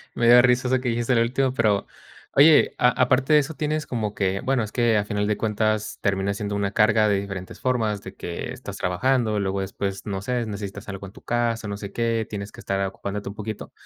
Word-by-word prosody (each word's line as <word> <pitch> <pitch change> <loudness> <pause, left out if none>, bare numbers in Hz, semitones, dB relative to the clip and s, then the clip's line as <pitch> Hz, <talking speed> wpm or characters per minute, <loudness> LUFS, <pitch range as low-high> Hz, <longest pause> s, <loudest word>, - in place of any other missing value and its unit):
me 120 - +2
da 120 +1 +9
risa 125 +1 +3
eso 130 0 +1
que 125 - -1
dijiste 120 +2 0
al 115 - +3
último 130 +3 +1
pero 110 -5 +1 0.5
oye, 150 +2 +6
a 125 - +5
aparte 130 +3 +2
de 150 - +8
eso, 145 +2 -3
tienes 155 0 -2
como 110 -4 -2
que 95 -1 -1
bueno, 135 -2 +1
es 105 -1 -4
que 120 -3 +3
a 105 - 0
final 105 -1 -1
de 105 0 0
cuentas 110 -1 -1
termina 100 0 0
siendo 100 0 -4
una 100 -1 -1
carga 110 0 +4
de 100 -2 +2
diferentes 95 -2 -7
formas, 110 -5 0
de 95 - -9
que 85 +6 -5
estás 125 -6 -8
trabajando, 110 +3 +1
luego 100 0 -1
después, 95 0 -4
no 95 -2 -3
sé, 120 +3 -1
necesitas 100 -1 -6
algo 100 0 -6
en 95 - -14
tu - - -15
casa, 115 -2 -1
no 100 0 -4
sé 100 -1 -7
qué, 115 -1 0
tienes 100 -1 -6
que - - -14
estar, 95 0 -2
ah, 95 - 0
ocupándote 100 +1 -5
un 100 - -9
poquito. 110 0 -6
110 Hz, 235 wpm, -24 LUFS, 100-120 Hz, 0.5 s, da